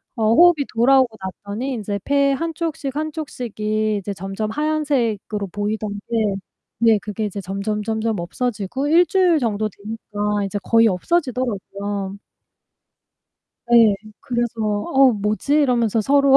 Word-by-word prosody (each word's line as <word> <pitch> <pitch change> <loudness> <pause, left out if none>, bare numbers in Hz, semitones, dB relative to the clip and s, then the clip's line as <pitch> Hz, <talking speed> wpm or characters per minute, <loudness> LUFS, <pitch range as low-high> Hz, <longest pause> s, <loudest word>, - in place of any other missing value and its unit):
어 225 - -2
호흡이 340 -4 +6
돌아오고 245 -1 +4
났더니 205 +7 -5
인제 205 -3 -3
폐 280 0 +2
한 330 +4 -2
쪽씩, 295 -4 -4
한 310 +1 -2
쪽씩이 215 -7 -2
이제 200 0 -4
점점 195 +3 -4
하얀색으로 265 -9 -1
보이던 205 0 -3
게 220 -4 +1 0.4
네, 225 -2 +4
그게 210 0 -4
이제 200 -1 -4
점점점점 210 +2 -2
없어지고 230 +7 -3
1 340 +3 +6
주일 360 -4 +3
정도 215 -4 0
되니까 210 0 -3
이제 205 +1 -3
거의 230 +2 +4
없어지더라고요. 205 - -2 1.6
예. 225 -3 +7 0.3
그래서 240 -1 -2
"어 245 +5 +3
뭐지?" 210 +7 -1
이러면서 240 -7 +2
서로 275 +3 +5
220 Hz, 285 characters per minute, -21 LUFS, 205-270 Hz, 1.6 s, 예